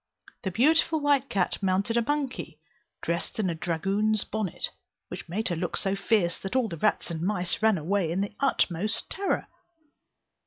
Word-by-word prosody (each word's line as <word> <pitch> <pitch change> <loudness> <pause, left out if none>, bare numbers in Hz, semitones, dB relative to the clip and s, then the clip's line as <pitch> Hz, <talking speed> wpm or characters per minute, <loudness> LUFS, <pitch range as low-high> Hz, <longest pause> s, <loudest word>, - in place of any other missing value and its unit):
The 190 - -2
beautiful 310 - +3
white 285 -3 +2
cat 195 0 0
mounted 195 +4 +1
a 235 - +4
monkey, 255 - -2 0.4
dressed 170 +7 -2
in 195 -5 +1
a - - -1
dragoon's 195 +6 +1
bonnet, 215 -5 -3 0.4
which - - -7
made 210 +6 -1
her 175 - 0
look 175 +2 -2
so 195 0 +1
fierce 195 -4 +1
that 195 +5 -5
all 255 -3 +3
the 175 - -5
rats 210 0 +1
and 160 -1 -4
mice 180 -1 -1
ran 220 -2 +4
away 170 +1 0
in 185 +3 0
the 200 +1 -3
utmost 210 -7 +1
terror. 395 0 0
200 Hz, 170 wpm, -27 LUFS, 175-225 Hz, 0.4 s, a